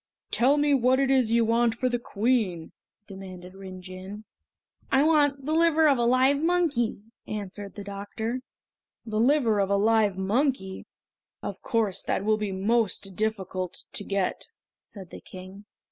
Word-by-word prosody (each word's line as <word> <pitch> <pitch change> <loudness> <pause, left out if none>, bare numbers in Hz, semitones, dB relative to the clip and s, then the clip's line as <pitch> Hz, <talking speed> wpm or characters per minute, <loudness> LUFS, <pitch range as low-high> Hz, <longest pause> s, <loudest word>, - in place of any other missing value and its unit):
"Tell 265 +5 +3
me 290 0 +3
what 260 0 +3
it 270 -1 +2
is 260 -4 +3
you 230 0 +3
want 230 0 +2
for 255 - -1
the 245 -1 -1
Queen?" 210 -7 -1 0.3
demanded 185 -2 -10
Rin 190 -1 -10
Jin. 190 +3 -9 0.7
"I 265 +1 +4
want 290 -3 +2
the 310 - -1
liver 320 -1 +4
of 275 -4 +3
a 235 - +2
live 260 +4 +3
monkey!" 320 - +1 0.2
answered 205 -1 -6
the 205 - -7
doctor. 205 +4 -4 0.7
"The 215 -2 -2
liver 240 -4 +3
of 195 -1 +1
a 200 - +3
live 210 -2 +2
monkey! 195 -1 -1 0.6
Of - - -5
course 215 -6 0
that 200 - -2
will 215 0 +3
be 210 -2 -3
most 195 -1 0
difficult 190 -4 -3
to - - -1
get," 195 -2 -2 0.3
said 190 -5 -12
the - - -10
King. 190 +2 -11
220 Hz, 160 wpm, -26 LUFS, 195-260 Hz, 0.7 s, I